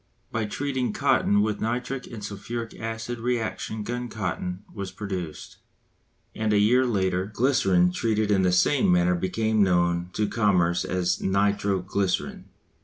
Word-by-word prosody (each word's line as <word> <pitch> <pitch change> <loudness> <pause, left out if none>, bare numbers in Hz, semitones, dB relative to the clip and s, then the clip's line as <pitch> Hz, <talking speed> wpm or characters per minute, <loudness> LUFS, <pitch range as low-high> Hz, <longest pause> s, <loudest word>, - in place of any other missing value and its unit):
By 110 -1 -1
treating 130 0 -2
cotton 105 0 +3
with 105 -1 -2
nitric 125 +3 -2
and 110 -4 -8
sulphuric 115 +3 -5
acid 115 +1 -5
reaction 115 -2 -2
gun 125 +3 -3
cotton 95 -2 -4
was 100 -2 -5
produced; 90 -7 -6 0.8
and 110 0 -1
a 105 - +4
year 125 +5 +4
later 95 -4 0
glycerine 95 -8 +3
treated 110 +2 0
in 100 -2 +4
the 90 -1 +3
same 90 +5 +3
manner 90 0 +3
became 110 +5 0
known 85 -2 +2
to 105 - 0
commerce 90 -7 +2
as 90 -1 0
nitro 100 0 +1
glycerine. 95 0 -2
105 Hz, 140 wpm, -25 LUFS, 90-115 Hz, 0.8 s, a